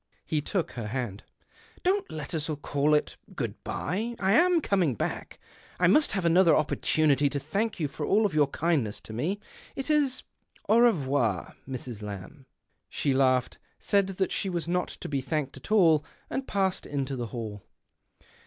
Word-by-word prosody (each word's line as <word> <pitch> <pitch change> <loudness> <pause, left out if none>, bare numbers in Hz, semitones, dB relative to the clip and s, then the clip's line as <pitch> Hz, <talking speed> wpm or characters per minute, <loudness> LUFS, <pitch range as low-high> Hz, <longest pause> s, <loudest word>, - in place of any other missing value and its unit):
He 155 -2 0
took 175 +3 -2
her 115 -3 -5
hand. 110 -4 -4 0.3
" - - -27
Don't 385 +2 +1
let 150 -1 -6
us 155 -1 -2
call 145 +1 +2
it 150 - -1 0.2
good - - -4
bye. 220 +9 -3
I 190 0 +2
am 345 - +5
coming 185 - +1
back. - - -4 0.4
I 180 - +4
must 295 - +4
have 195 -4 -1
another 170 +1 +5
opportunity 150 -1 +2
to 145 - -3
thank 200 +11 -2
you 155 - 0
for 140 +2 -6
all 210 +7 +3
your 150 -2 +4
kindness 140 -8 0
to 110 - -10
me. 165 - -1 0.4
It 270 +3 -2
is 285 -4 +2 0.4
an 225 - +5
revoir, 140 - +2
Mrs. 125 -4 -6
Lamb." 105 +7 -8 0.4
She 140 - 0
laughed, 130 -1 +2 0.2
said 200 -2 +2
that 190 - 0
she 195 - -1
was 170 -2 -3
not 180 +1 0
to - - -8
be 140 -2 -1
thanked 145 0 -2
at - - -11
all, 165 -8 +5 0.3
and 265 0 -3
passed 190 -2 0
into 140 -1 -2
the 120 -2 -3
hall. 110 -3 -6
155 Hz, 170 wpm, -28 LUFS, 135-195 Hz, 0.4 s, am